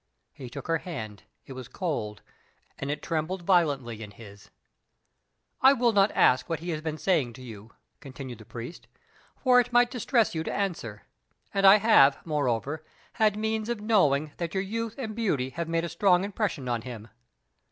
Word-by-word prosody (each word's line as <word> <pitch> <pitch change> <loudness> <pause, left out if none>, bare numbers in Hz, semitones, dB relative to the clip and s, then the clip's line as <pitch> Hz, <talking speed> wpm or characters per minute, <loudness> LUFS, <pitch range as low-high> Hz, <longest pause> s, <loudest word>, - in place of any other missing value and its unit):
He 130 -3 -9
took - - -8
her 165 -1 0
hand; 110 - -7 0.2
it 135 - -9
was 130 -2 -8
cold, 110 - -4 0.6
and 140 - -4
it 150 +1 -3
trembled 170 +3 -2
violently 145 - +1
in 105 - -7
his. 100 -1 -14 1.1
"I 265 +1 +7
will 245 -3 +2
not 200 0 +4
ask 130 +6 +3
what 165 -2 -2
he 175 +2 -4
has 155 -1 -3
been 155 -1 -4
saying 150 -10 +1
to 130 +2 -12
you," 110 -2 -11 0.3
continued 130 -4 -9
the 110 - -13
priest; 120 +8 -9 0.5
"for 250 -2 +5
it 245 0 0
might 245 0 +4
distress 240 -2 +1
you 160 -1 -2
to - - -4
answer, 165 - -3 0.5
and 195 0 +4
I 195 - +10
have, 200 -11 +5
moreover, 145 -1 -1 0.4
had 210 -1 +4
means 220 +1 -2
of 240 -2 -2
knowing 155 -9 +2
that 170 +1 -4
your 190 - 0
youth 230 +2 -4
and 220 -6 -5
beauty 150 - -1
have 165 +4 -4
made 165 0 0
a - - -2
strong 180 +1 +3
impression 200 - -3
on 120 -2 -1
him. 115 -2 -9
165 Hz, 185 wpm, -27 LUFS, 130-205 Hz, 1.1 s, I